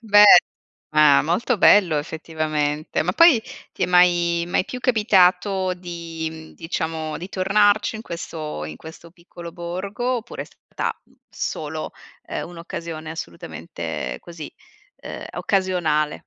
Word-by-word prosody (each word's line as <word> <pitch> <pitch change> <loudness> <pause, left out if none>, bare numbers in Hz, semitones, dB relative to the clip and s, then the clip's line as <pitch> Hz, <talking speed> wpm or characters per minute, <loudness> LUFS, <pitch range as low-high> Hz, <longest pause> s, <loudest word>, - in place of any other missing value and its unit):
Beh 210 -2 +6 0.7
ma 150 -2 +6
molto 190 - 0
bello, 180 -7 +5
effettivamente. 155 -1 -2
Ma 180 +3 -1
poi 310 - +6 0.3
ti - - -5
è - - +3
mai 175 -1 +3
mai 185 - +1
più 250 - -7
capitato 190 -4 +3
di, 170 -2 -6
mhmm, 160 0 -11
diciamo 160 -2 -4
di 180 +3 -7
tornarci 205 +3 +2
in 220 - -8
questo 155 - -6
in 75 0 -7
questo 165 +1 -12
piccolo 170 -1 -11
borgo, 195 +9 -3
oppure 235 +1 -6
è - - -11
stata, - - -5
mh, - - -29 0.2
solo, - - -4 0.4
uhm, - - -4
un'occasione 165 -2 -7
assolutamente 120 - -6
così, 170 -3 -9 0.5
uhm, - - -7
occasionale? 175 -6 0
170 Hz, 130 wpm, -22 LUFS, 160-195 Hz, 0.7 s, Beh